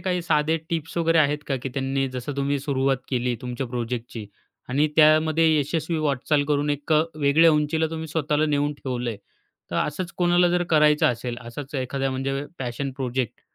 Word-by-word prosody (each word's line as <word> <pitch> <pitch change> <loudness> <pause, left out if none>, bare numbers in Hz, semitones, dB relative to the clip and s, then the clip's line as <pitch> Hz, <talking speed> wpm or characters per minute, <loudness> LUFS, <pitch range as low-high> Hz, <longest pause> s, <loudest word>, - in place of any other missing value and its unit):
काही 180 0 -1
साधे 155 0 +2
टिप्स 160 0 -3
वगैरे 165 0 +3
आहेत 150 0 +3
का, 135 - -1
की 130 +2 -5
त्यांनी 135 +1 -1
जसं 130 +3 -5
तुम्ही 140 0 0
सुरुवात 135 -1 0
केली 125 -1 0
तुमच्या 125 +1 -4
प्रोजेक्टची 120 -2 -5 0.4
आणि 145 +4 +2
त्यामध्ये 155 +1 +5
यशस्वी 160 +3 -1
वाटचाल 145 0 +1
करून 145 0 +1
एक 145 +2 -2
अ, 155 0 +5 0.2
वेगळ्या 150 +3 +5
उंचीला 155 +1 +1
तुम्ही 160 0 -5
स्वतःला 150 0 0
नेऊन 145 0 +1
ठेवलंय. 125 -5 -4 0.5
तर - - -2
असंच 170 +4 -2
कोणाला 175 0 +4
जर 175 0 +2
करायचं 150 -1 +4
असेल, 120 0 -2
असाच 130 +5 -8
एखाद्या 135 +1 -2
म्हणजे 135 +2 -2
पॅशन 135 +2 -3
प्रोजेक्ट 130 -3 -3
145 Hz, 170 wpm, -24 LUFS, 130-155 Hz, 0.5 s, त्यामध्ये